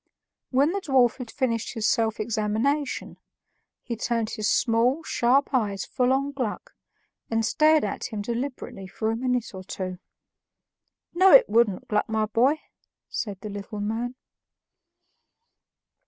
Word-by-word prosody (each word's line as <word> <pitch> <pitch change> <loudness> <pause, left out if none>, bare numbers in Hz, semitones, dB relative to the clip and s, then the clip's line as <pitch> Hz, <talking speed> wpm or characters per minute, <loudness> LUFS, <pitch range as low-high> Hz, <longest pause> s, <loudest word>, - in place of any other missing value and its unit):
When 280 +4 +3
the 400 +1 -2
dwarf 260 -7 +3
had 250 -3 -7
finished 235 -4 -2
his 220 -2 -2
self 225 -1 +1
examination, 225 +6 -1 0.6
he 235 - -4
turned 230 0 -1
his 215 -2 -1
small, 245 +6 +2
sharp 270 +1 +2
eyes 205 -6 0
full 250 0 +1
on 275 +2 +1
Gluck 255 -7 -4 0.6
and 225 -1 +1
stared 310 +3 +4
at - - -3
him 215 -3 -4
deliberately 235 -4 -5
for 220 +3 -2
a - - -1
minute 250 -1 -1
or 190 0 -8
two. 185 -1 -5 1.1
"No, 375 +2 +6
it - - +8
wouldn't, 220 -4 +2
Gluck, 210 +1 0
my 220 -1 +1
boy," 250 +8 +2 0.5
said 200 -4 -4
the 215 - -6
little 205 +1 -6
man. 225 +4 -2
230 Hz, 140 wpm, -25 LUFS, 215-265 Hz, 1.1 s, it